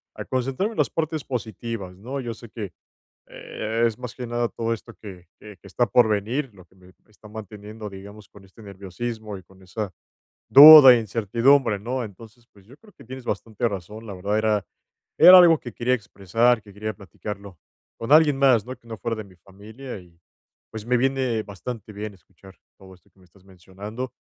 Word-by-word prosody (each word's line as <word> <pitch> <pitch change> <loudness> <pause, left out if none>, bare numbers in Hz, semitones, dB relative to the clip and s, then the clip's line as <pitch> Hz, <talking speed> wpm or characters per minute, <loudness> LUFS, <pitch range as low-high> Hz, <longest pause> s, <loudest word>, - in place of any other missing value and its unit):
a - - -7
concentrarme 135 - -2
en - - -14
las - - +2
partes 155 -2 -3
positivas, 110 -5 -6
¿no? 125 +8 -7
Yo 120 -3 -5
sé 115 0 -14
que, 105 -6 -8 0.5
eh, 115 +2 -4
es 115 0 -3
más 125 -2 -8
que 125 - -7
nada 120 0 -2
todo 115 0 -3
esto 115 - -7
que 95 -4 -12
que 105 -1 -13
que 95 - -19
está 120 +5 0
por 110 +2 +3
venir, 115 +6 -2
lo 95 -2 -16
que 90 - -30
me 90 -1 -20 0.2
me - - -31
está 105 0 -17
manteniendo, 105 0 -9
digamos, 100 +2 -12
con 100 - -18
este 95 +4 -18
nerviosismo 105 +2 -7
y - - -15
con 95 +1 -22
esa 100 +1 -6 0.6
duda 145 -1 +11
e 120 - +2
incertidumbre, 115 +2 +1
¿no? 125 +4 -4
Entonces, 115 +3 -14
pues, 100 -2 -22
yo 130 +5 -17
creo 210 +6 -21
que - - -18
tienes 130 +1 -10
bastante 115 +1 -3
razón. 105 +3 -8
La 100 - -7
verdad, 100 +3 -2
era 110 -2 0 0.5
era 185 0 +10
algo 170 -3 +6
que 120 - -9
quería 125 +3 0
expresar, 115 +2 0
que 100 -1 -16
quería 110 +1 -5
platicarlo 100 0 -10 0.4
con 115 +3 -6
alguien 150 -3 +5
más, 125 -6 +3
¿no?, 130 - -6
que 115 - -23
no 115 - -7
fuera 115 -1 -3
de 110 - -6
mi 95 -2 -19
familia, 105 +7 -11
y 85 -2 -21 0.5
pues 110 -1 -8
me 125 0 +2
viene 130 -3 -1
bastante 105 +2 -8
bien 105 0 -7
escuchar 95 +2 -19 0.2
todo 95 -1 -16
esto 90 - -25
que - - -33
me - - -21
estás 90 +2 -25
mencionando. 100 +6 -9
110 Hz, 205 wpm, -23 LUFS, 100-125 Hz, 0.6 s, duda